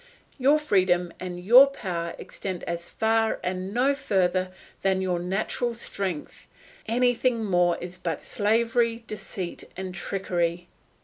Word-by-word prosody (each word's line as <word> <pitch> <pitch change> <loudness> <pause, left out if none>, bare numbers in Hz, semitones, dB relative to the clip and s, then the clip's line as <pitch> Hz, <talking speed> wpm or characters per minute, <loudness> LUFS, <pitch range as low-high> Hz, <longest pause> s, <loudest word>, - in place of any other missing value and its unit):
Your 280 +4 +5
freedom 185 - +2
and 180 -1 -5
your 240 +9 +8
power 175 -10 -4
extend 185 -3 -6
as 170 0 -4
far 225 0 +1
and 185 +1 -3
no 255 +5 +3
further 185 -7 +1 0.3
than 190 -1 +2
your 185 -2 0
natural 210 +6 -1
strength; 190 -8 -4 0.4
anything 245 0 +2
more 175 -3 +3
is 180 +1 -8
but - - -3
slavery, 230 +2 +1
deceit, 195 -4 -6
and 190 -1 -5
trickery. 175 -3 -2
190 Hz, 125 wpm, -26 LUFS, 180-230 Hz, 0.4 s, your